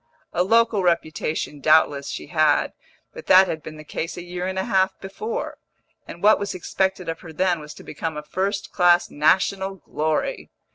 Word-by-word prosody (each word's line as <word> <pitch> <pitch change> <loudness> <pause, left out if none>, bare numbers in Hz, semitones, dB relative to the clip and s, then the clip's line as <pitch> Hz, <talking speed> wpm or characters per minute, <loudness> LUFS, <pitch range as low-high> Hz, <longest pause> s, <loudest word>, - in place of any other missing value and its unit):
A 175 - +1
local 225 +1 +3
reputation 155 -3 -1
doubtless 145 -2 +3
she - - -5
had, 155 -3 +2 0.4
but - - -11
that 185 +1 +7
had 160 -2 -4
been 155 +1 -9
the 155 - -10
case 165 +3 -5
a 175 - -6
year 180 +1 -4
and 190 0 -4
a 190 - 0
half 190 0 +1
before, 440 - -5 0.5
and 170 - -10
what 215 +1 +6
was 200 -1 -4
expected 190 0 -2
of 165 0 -4
her 165 -2 -11
then 175 +1 +1
was 150 0 -10
to - - -13
become 155 +1 -5
a 150 - -5
first 195 +5 -3
class 175 -1 +3
national 190 +5 +1
glory. 160 - -2
175 Hz, 185 wpm, -23 LUFS, 155-190 Hz, 0.5 s, that